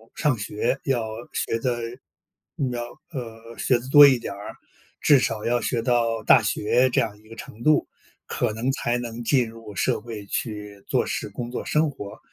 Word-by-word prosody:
上 145 -7 +1
学， 105 0 -1
要 120 -4 +1 0.3
学 115 - -1
得， 120 -1 -1 0.9
要 120 -1 -3 0.3
呃， 115 -4 -8
学 120 +5 +2
得 130 +2 -9
多 145 +1 +10
一 130 -3 +4
点 100 - -5
儿， 100 +1 -8 0.5
至 145 -3 +6
少 115 -4 -1
要 120 +1 +2
学 120 -2 0
到 115 -3 +1
大 120 +2 +7
学 110 +5 +2
这 135 - +3
样 105 -3 -3
一 110 - -21
个 115 - -10
程 110 0 -10
度， 155 -1 +4 0.4
可 105 - -1
能 120 +4 -1
才 120 -3 -1
能 120 -1 -5
进 125 -2 +2
入 115 -2 -11
社 - - +1
会 110 -3 -7
去 105 -2 -4
做 - - +1
事 - - -3
工 120 +4 -6
作 - - -4
生 155 -1 +2
活。 100 -7 -9
115 Hz, 200 characters per minute, -24 LUFS, 110-125 Hz, 0.9 s, 多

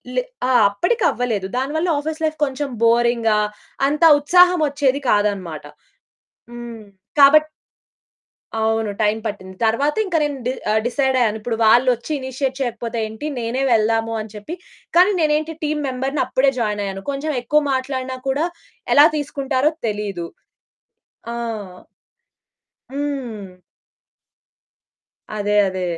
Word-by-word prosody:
లే - - +2 0.3
ఆ! - - +2 0.2
అప్పడికవ్వలేదు. 245 - 0
దానివల్ల 300 +6 -1
ఆఫీస్ 315 +2 -5
లైఫ్ 310 0 0
కొంచెం 275 +1 -4
బోరింగ్‌గా 230 -1 +3 0.5
అంత 300 +3 -1 0.2
ఉత్సాహమొచ్చేది 295 -4 +3
కాదనమాట. 195 -7 0 0.9
హ్మ్. 240 -2 -8 0.4
కాబట్టి 305 +2 +7 1.1
అవును. 220 -1 0
టైం 210 +1 +2
పట్టింది. 190 -3 -6
తరువాత 275 +7 +1
ఇంక 375 -3 -4
నేను 290 -2 -2
డి 250 - +1 0.2
ఆహ్, 215 - +3
డిసైడయ్యాను, 250 -4 +1
ఇప్పుడు 225 +1 -3
వాళ్ళోచ్చి 245 +4 +3
ఇనిషియేట్ 260 0 -3
చేయకపోతే 235 -1 -3
ఏంటి, 220 +7 -6
నేనే 235 +3 -2
వెళ్దాము 225 0 +2
అని 215 -1 -9
చెప్పి, 210 +12 -7 0.4
కానీ 370 +4 +6
నేనేంటి 310 +1 +1
టీమ్ 300 0 -1
మెంబర్‌ని, 265 +2 -2
అప్పుడే 270 +1 +2
జాయిన్ 210 -3 -1
అయ్యాను. 195 0 -5
కొంచెం 290 +3 -3
ఎక్కువ 300 +5 +2
మాట్లాడిన 260 0 -3
కూడా 285 +5 +1 0.5
ఎలా 290 - +8
తీసుకుంటారో 275 0 0 0.2
తెలీదు. 205 -5 -3 1.0
ఆ! - - -4 1.6
హ్మ్. 245 -10 -5 1.8
అదే. 205 0 0
అదే. 185 0 -4
255 Hz, 115 wpm, -20 LUFS, 220-290 Hz, 1.8 s, ఎలా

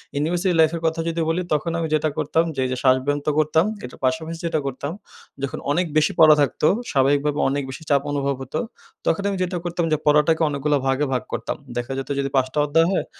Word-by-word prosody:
University 175 +5 0
লাইফের 160 +1 +3
কথা 160 +1 0
যদি 165 0 -1
বলি, 170 +3 0
তখন 160 +3 0
আমি 165 - -1
যেটা 155 0 +2
করতাম 165 - +1
যে - - -4
এই 130 - -2
যে 130 - -2
শ্বাসব্যন্ত 135 +3 +2
করতাম, 155 +2 +3 0.2
এটার 125 - -9
পাশাপাশি 160 +4 -1
যেটা 160 -2 0
করতাম, 140 +2 -4 0.5
যখন 135 - -3
অনেক 180 +4 +1
বেশি 155 0 +3
পড়া 155 -1 +8
থাকতো 145 +2 +1 0.2
স্বাভাবিকভাবে 145 +2 +2
অনেক 140 +1 -1
বেশি 145 +5 -8
চাপ 140 -2 +4
অনুভব 140 -1 0
হতো, 130 - -4 0.5
তখন - - +1
আমি 195 - -2
যেটা 180 0 -2
করতাম 175 -1 -1
যে 155 - +3
পড়াটাকে 150 +2 +4
অনেকগুলা 145 +1 0
ভাগে 135 +2 +1
ভাগ 125 - -1
করতাম। - - -3 0.2
দেখা 120 +2 -3
যেত 135 - -5
যদি 140 - -1
৫ 130 -1 +3
টা 150 - 0
অধ্যায় 165 +3 +3
হয়, 195 - 0
150 Hz, 210 wpm, -22 LUFS, 140-165 Hz, 0.5 s, পড়া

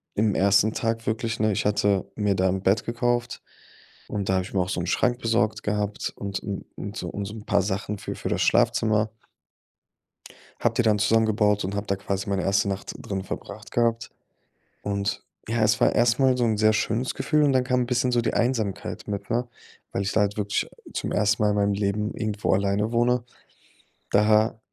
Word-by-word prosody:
im 105 0 +2
1. 100 +2 +4
Tag 115 0 -2
wirklich, 115 +1 -1
ne 110 -1 +2
ich - - -1
hatte 100 -2 +2
mir 105 -2 +1
da 95 0 +2
'n 95 +1 -1
Bett 95 +3 +2
gekauft 120 0 -1 0.7
und 100 -2 -3
da 95 - +3
habe 95 - +1
ich - - -10
mir 95 - +1
auch 90 - -1
so 90 - -1
'n - - -3
Schrank 125 +6 +1
besorgt 110 -1 +1
gehabt 105 0 -2
und 100 -1 -4
un 100 -1 -5
und 100 +2 -6
so - - -4
und 100 - -4
so 105 - -7
'n 110 -1 -10
paar 100 - +2
Sachen 100 +1 -3
für - - -5
für - - -5
das - - 0
Schlafzimmer. 110 0 +2 1.5
Habe 115 -1 +1
die 120 - +3
dann 105 -2 +3
zusammengebaut 105 -2 +2
und 100 - -3
habe 100 +1 -3
da 100 - +1
quasi 100 0 -3
meine 95 -2 0
1. 100 +1 +2
Nacht 95 0 -4
drin 95 -1 -4
verbracht - - -8
gehabt. 115 -1 0 0.7
Und, 100 0 -2 0.3
ja, 115 -1 +1
es 110 0 +3
war - - +4
erstmal 125 +2 +3
so 120 - +1
'n 110 -2 +1
sehr 110 +1 +4
schönes 115 +3 0
Gefühl 150 0 +2
und 140 - +3
dann 130 -1 +3
kam 125 0 +1
'n - - 0
bisschen 125 0 +1
so 120 -1 +2
die - - -1
Einsamkeit 115 -5 -1
mit, 100 -1 -4
ne? 120 +2 0 0.4
Weil - - -1
ich 100 - -1
da 110 - +2
halt 105 +1 0
wirklich 100 -1 -1 0.3
zum - - -3
1. 105 +1 +2
Mal 105 - +4
in 105 - 0
meinem 100 0 +2
Leben 105 +1 -1
irgendwo 110 -2 -1
alleine 100 +3 +1
wohne. 120 +1 +2 0.9
Da 110 +2 +3
105 Hz, 205 wpm, -25 LUFS, 100-115 Hz, 1.5 s, 1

